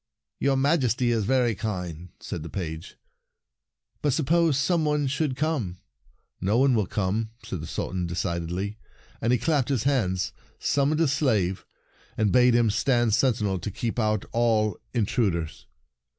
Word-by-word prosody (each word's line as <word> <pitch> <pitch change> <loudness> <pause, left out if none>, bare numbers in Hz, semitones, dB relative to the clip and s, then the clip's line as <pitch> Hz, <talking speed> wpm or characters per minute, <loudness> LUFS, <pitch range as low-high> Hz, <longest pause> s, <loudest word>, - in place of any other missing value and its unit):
" - - -65
Your 135 -1 +2
Majesty 130 -4 +2
is 110 -3 +1
very 125 -1 +2
kind," 90 -5 -5
said - - -5
the 80 - -7
page. 85 -2 -5 0.5
" - - -52
But 145 -3 +1
suppose 160 0 +2
some 165 +3 +2
one 150 -1 +1
should 140 0 -1
come?" 135 - -1 0.3
" - - -43
No 100 +5 +2
one 135 +1 +4
will 105 -5 +1
come," 105 +3 -1 0.2
said 95 -7 -5
the 80 - -6
Sultan 90 -1 -3
decidedly, 85 +4 -3 0.4
and 115 - +1
he 125 - +4
clapped 140 +1 +1
his 130 -6 0
hands, 95 -10 0 0.2
summoned 145 +3 +1
a 165 - +4
slave, 110 - 0 0.5
and 105 -3 +2
bade 125 -1 +5
him 115 -3 +3
stand 120 0 +2
sentinel 105 -6 +1
to 85 - -4
keep 115 +4 -3
out 110 -2 +1
all 110 -4 +1
intrud 110 -4 +1
ers. 80 -2 -6
115 Hz, 165 wpm, -26 LUFS, 95-135 Hz, 0.5 s, bade